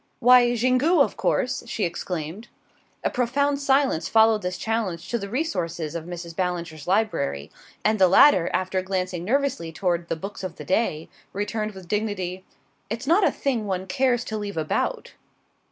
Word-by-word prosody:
"Why, 245 0 +6
Xingu, 255 +8 +3
of 280 - +3
course!" 255 - 0
she 225 - -3
exclaimed. 170 +4 -4 0.6
A - - 0
profound 280 +4 +1
silence 270 - +2
followed 220 -1 +4
this 180 -1 -3
challenge 205 -7 -2
to 235 - -1
the 200 -1 -6
resources 175 - -2
of 165 -1 -5
Mrs. 170 -1 -7
Ballinger's 170 -4 -3
library, 180 - 0 0.3
and 215 0 +2
the 190 - +7
latter, 185 - +6
after 185 0 0
glancing 185 -2 -3
nervously 245 -7 0
toward 170 0 -1
the - - 0
Books 195 +5 -7
of 180 -3 -5
the - - -9
Day, 185 -6 0 0.3
returned 215 +1 -3
with 190 -2 -11
dignity: 190 -3 -2 0.5
"It's 230 +5 -4
not 345 +8 +4
a - - +5
thing 240 -7 -2
one 185 -1 -2
cares 245 +3 +1
to 215 -1 -4
leave 205 -3 -5
about." 155 -1 -2
200 Hz, 165 wpm, -24 LUFS, 175-240 Hz, 0.6 s, the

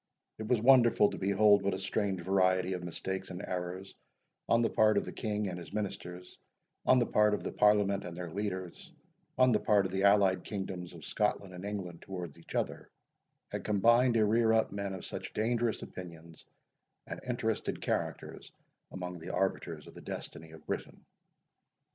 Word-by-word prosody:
It 110 - -5
was 120 -1 +3
wonderful 120 -5 +6
to - - -6
behold 100 +1 +4
what 100 -1 0
a - - -5
strange 95 -1 -1
variety 95 0 +2
of 90 -1 -4
mistakes 95 +2 -4
and 90 -1 -6
errors, 90 +2 -5 0.6
on 115 0 +4
the 115 - +2
part 110 0 +4
of - - +1
the - - -6
King 105 -2 -2
and 90 -1 -4
his 85 -2 -10
Ministers, 90 -3 -5 0.5
on 130 - +6
the 120 - +3
part 105 -1 +3
of - - -7
the - - -3
Parliament 105 -1 +3
and 85 -1 -7
their 90 -2 -5
leaders, 95 -2 -5 0.5
on 130 0 +5
the 105 - +3
part 105 -3 +3
of 95 - -3
the 95 +1 -1
allied 100 -2 +4
kingdoms 95 -3 -5
of 80 - -10
Scotland 100 -2 -1
and 90 +1 -8
England 95 -5 -5
towards 90 -5 -7
each 85 - -11
other, - - -2 0.6
had - - -5
combined 115 +4 +4
to 110 -1 +4
rear 110 +1 +3
up 110 0 +2
men 100 -1 -3
of 95 - -8
such - - -6
dangerous 115 +1 0
opinions 85 -3 -10 0.6
and - - -6
interested - - -2
characters - - -3 0.4
among 90 -1 -6
the 85 +3 -8
arbiters 85 -5 -2
of - - -13
the - - -11
destiny 80 - -7
of 80 -1 -14
Britain. - - -5
95 Hz, 180 wpm, -31 LUFS, 90-105 Hz, 0.6 s, wonderful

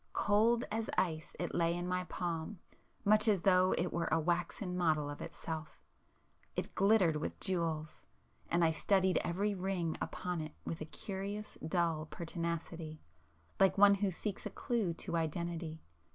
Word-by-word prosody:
Cold 225 +3 +3
as 220 +1 -1
ice 160 -3 0
it 175 - -2
lay 170 0 +2
in 175 0 -3
my 180 0 -1
palm 175 +3 -3 0.5
much 215 +2 +5
as 200 -5 +3
though 185 -1 +5
it 175 0 0
were 170 0 0
a 165 - +4
waxen 175 +3 -1
model 155 -4 +2
of 145 - -8
itself;—it 160 -1 -8
glittered 195 -5 +4
with 150 - -4
jewels,—and 160 - -2
I 160 - +4
studied 190 +3 +3
every 200 +4 0
ring 185 -4 -1
upon 180 -2 -3
it 155 -1 -6
with 165 - -4
a - - -2
curious, 200 +5 -5
dull 160 -1 0
pertinacity, 165 -1 -4 0.6
like 195 +1 +5
one 200 0 +8
who 200 0 +1
seeks 195 +3 -4
a - - -3
clue 215 -9 -1
to 170 - -4
identity. 165 0 -3
175 Hz, 150 wpm, -34 LUFS, 160-195 Hz, 0.6 s, one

